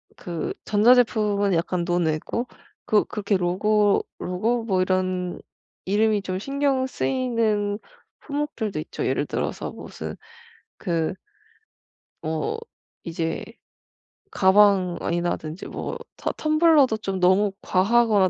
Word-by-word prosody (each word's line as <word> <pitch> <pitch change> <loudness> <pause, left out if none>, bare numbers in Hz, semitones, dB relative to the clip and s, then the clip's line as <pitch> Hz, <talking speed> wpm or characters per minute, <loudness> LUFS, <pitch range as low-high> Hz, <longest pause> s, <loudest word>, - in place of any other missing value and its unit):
그 170 -2 -4
전자제품은 210 -3 +3
약간 170 +1 0
논외고 175 +6 0 0.4
그 210 -1 +4
그렇게 205 -1 -1
로고 200 +3 +2
로고 225 +7 -1
뭐 190 -5 +1
이런 185 -1 -1 0.4
이름이 210 +2 +2
좀 185 -1 -3
신경 275 +3 0
쓰이는 230 -6 0 0.4
품목들도 285 - -3
있죠. 155 - -3
예를 - - 0
들어서 - - -3
무슨 - - -7 0.6
그 170 -1 -1 1.1
뭐 160 - -2 0.5
이제 165 -1 -3 0.9
가방이라든지 180 -4 +2
뭐 475 - -5 0.2
터 - - -2
텀블러도 310 -7 +3
좀 195 -2 -2
너무 190 +3 +4
과하거나 205 0 +3
200 Hz, 220 characters per minute, -24 LUFS, 180-230 Hz, 1.1 s, 그